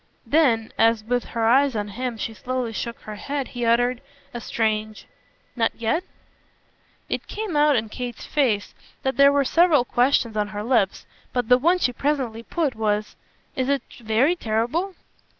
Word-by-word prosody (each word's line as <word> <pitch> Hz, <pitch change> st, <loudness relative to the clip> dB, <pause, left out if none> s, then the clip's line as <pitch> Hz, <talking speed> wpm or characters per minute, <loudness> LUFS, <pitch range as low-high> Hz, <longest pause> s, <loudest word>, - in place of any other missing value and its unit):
Then 245 Hz, -8 st, +2 dB
as 225 Hz, -1 st, +4 dB
with 245 Hz, +2 st, -1 dB
her 230 Hz, -2 st, -2 dB
eyes 265 Hz, +2 st, +4 dB
on 210 Hz, -1 st, -2 dB
him 245 Hz, +2 st, -4 dB
she 225 Hz, -, -4 dB
slowly 245 Hz, +2 st, -3 dB
shook 235 Hz, +2 st, -4 dB
her 215 Hz, -, -8 dB
head 275 Hz, +5 st, -4 dB
he 240 Hz, -1 st, -3 dB
uttered 245 Hz, +2 st, +2 dB, 0.3 s
a 240 Hz, -, -5 dB
strange 215 Hz, -1 st, -2 dB, 0.5 s
"Not 225 Hz, -2 st, +1 dB
yet?" 235 Hz, +10 st, 0 dB, 1.0 s
It -, -, -3 dB
came 420 Hz, -6 st, -4 dB
out 295 Hz, -1 st, +4 dB
in 225 Hz, -2 st, 0 dB
Kate's 240 Hz, +1 st, -6 dB
face 235 Hz, -9 st, 0 dB, 0.3 s
that 265 Hz, 0 st, 0 dB
there 280 Hz, 0 st, +7 dB
were 280 Hz, -1 st, +2 dB
several 330 Hz, -4 st, +4 dB
questions 245 Hz, -2 st, +2 dB
on 210 Hz, -1 st, 0 dB
her 210 Hz, 0 st, -5 dB
lips, 225 Hz, -5 st, +1 dB, 0.3 s
but 245 Hz, -3 st, -1 dB
the 250 Hz, 0 st, +6 dB
one 345 Hz, +7 st, +3 dB
she 250 Hz, -8 st, 0 dB
presently 260 Hz, -4 st, -1 dB
put 295 Hz, +2 st, -1 dB
was: 215 Hz, -1 st, -1 dB, 0.4 s
"Is 260 Hz, 0 st, -1 dB
it 280 Hz, -1 st, +1 dB, 0.2 s
very 235 Hz, +9 st, +2 dB
terrible?" 275 Hz, -, -1 dB
245 Hz, 170 wpm, -23 LUFS, 220-280 Hz, 1.0 s, there